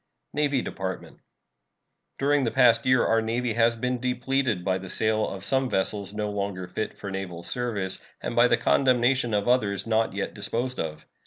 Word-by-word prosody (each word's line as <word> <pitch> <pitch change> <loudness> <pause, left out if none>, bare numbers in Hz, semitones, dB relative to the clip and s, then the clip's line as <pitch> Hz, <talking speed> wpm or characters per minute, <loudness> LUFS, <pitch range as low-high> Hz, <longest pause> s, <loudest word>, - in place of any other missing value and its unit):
NAVY 145 -3 +1
DEPARTMENT. 95 -1 -6 1.0
During 145 0 +2
the 120 - +1
past 125 -1 +4
year 130 -1 +4
our 115 0 +3
Navy 115 +1 -1
has 115 +1 +3
been 125 +2 -2
depleted 125 -4 0
by 95 -1 +1
the 95 0 -9
sale 110 +2 +1
of 95 -1 -7
some 135 -1 +1
vessels 100 0 -1
no 105 0 -3
longer 100 -2 -3
fit 90 +4 -4
for 100 - -6
naval 90 -3 -5
service 105 -6 -2 0.2
and - - -4
by - - +6
the - - +3
condemnation 130 -1 +2
of 100 +2 0
others 100 -6 +1
not 110 -1 +1
yet 100 0 -3
disposed 120 +5 -2
of. 80 -1 -4
115 Hz, 175 wpm, -26 LUFS, 100-125 Hz, 1.0 s, by